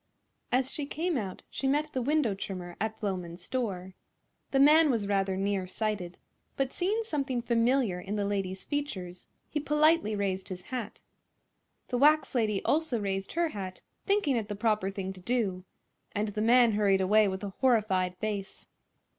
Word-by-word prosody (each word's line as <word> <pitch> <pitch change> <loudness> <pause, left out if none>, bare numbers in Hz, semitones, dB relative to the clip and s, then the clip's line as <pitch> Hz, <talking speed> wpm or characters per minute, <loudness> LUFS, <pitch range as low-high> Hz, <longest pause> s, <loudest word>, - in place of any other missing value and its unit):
As 260 +1 +2
she 290 -2 -3
came 335 +4 -1
out 200 -7 -4
she 270 - -2
met 300 +3 +1
the 260 - -1
window 280 -4 +2
trimmer 185 -3 -6
at 220 0 -2
Floman's 180 -4 -4
store. 190 -6 -3 0.6
The 270 - +1
man 305 +3 +7
was 230 -6 +1
rather 195 -1 0
near 195 -1 -1
sighted, 190 -3 -3 0.4
but 270 -1 0
seeing 415 +5 0
something 275 - -2
familiar 235 -4 +2
in 200 +3 -4
the 205 -1 0
lady's 195 -2 -2
features 190 -12 -4 0.2
he 300 - -2
politely 300 -5 +3
raised 195 -1 -2
his 180 -1 -6
hat. 245 -5 -6 0.9
The 245 - 0
wax 305 +3 +4
lady 215 -5 0
also 310 -6 +1
raised 195 -1 -3
her 340 0 +1
hat, 190 -7 -7 0.2
thinking 400 -10 +2
it 220 -3 -2
the 205 - -4
proper 210 -2 +1
thing 195 -1 -4
to 185 - -13
do, 195 -4 -1 0.5
and 210 +1 -1
the 210 +1 -3
man 235 +1 +5
hurried 205 -2 +3
away 210 +3 +4
with 190 +1 -3
a 200 - -3
horrified 195 -8 +2
face. 205 -1 -4
215 Hz, 170 wpm, -29 LUFS, 195-270 Hz, 0.9 s, man